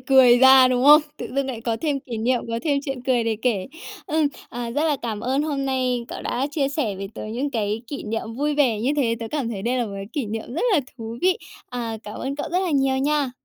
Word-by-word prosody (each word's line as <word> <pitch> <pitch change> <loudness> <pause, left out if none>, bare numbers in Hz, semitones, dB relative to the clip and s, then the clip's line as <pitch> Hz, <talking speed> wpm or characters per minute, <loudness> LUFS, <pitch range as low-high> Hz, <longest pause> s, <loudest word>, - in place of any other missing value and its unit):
cười 260 -3 +6
ra, 265 0 +8
đúng 255 +1 +1
không? 295 +1 +9 0.2
Tự - - -5
dưng 275 -1 0
lại 240 -4 -4
có 230 -1 -1
thêm 290 -2 0
kỷ 245 -3 -6
niệm, 245 +2 +1
có 230 0 -1
thêm 290 -3 +1
chuyện 270 -3 -4
cười 250 -3 +1
để 225 -1 0
kể. 220 -7 0 0.4
Ừm, 310 0 +2 0.2
à, 240 -1 -5
rất 295 +6 0
là 300 -3 +2
cảm 220 -3 -3
ơn 265 +3 0
hôm 285 -3 -2
nay 255 -2 0
cậu - - -7
đã 260 +3 -1
chia 285 -2 0
sẻ 260 -9 -2
với 195 0 -5
tớ - - -6
những 245 +7 -3
cái 220 -2 -2
kỷ 285 - -6
niệm 225 +1 -4
vui 295 +3 0
vẻ 255 -8 +2
như 250 +5 +1
thế, 235 -5 +2
tớ 225 - -4
cảm 280 -6 -1
thấy 200 -4 -5
đây 250 +3 0
là 240 - +1
một 200 - -7
cái 195 0 -6
kỷ 275 -6 -2
niệm 225 +3 -5
rất 335 - -1
là 330 - +4 0.2
thú 225 0 -6
vị. 370 +3 +3 0.3
À, 230 -2 -3
cảm 210 -1 -8
ơn 275 +2 -3
cậu 290 - -4
rất 360 - +2
là 360 - -1
nhiều 270 -2 +2
nha! 285 -1 +1
255 Hz, 270 wpm, -23 LUFS, 230-280 Hz, 0.4 s, không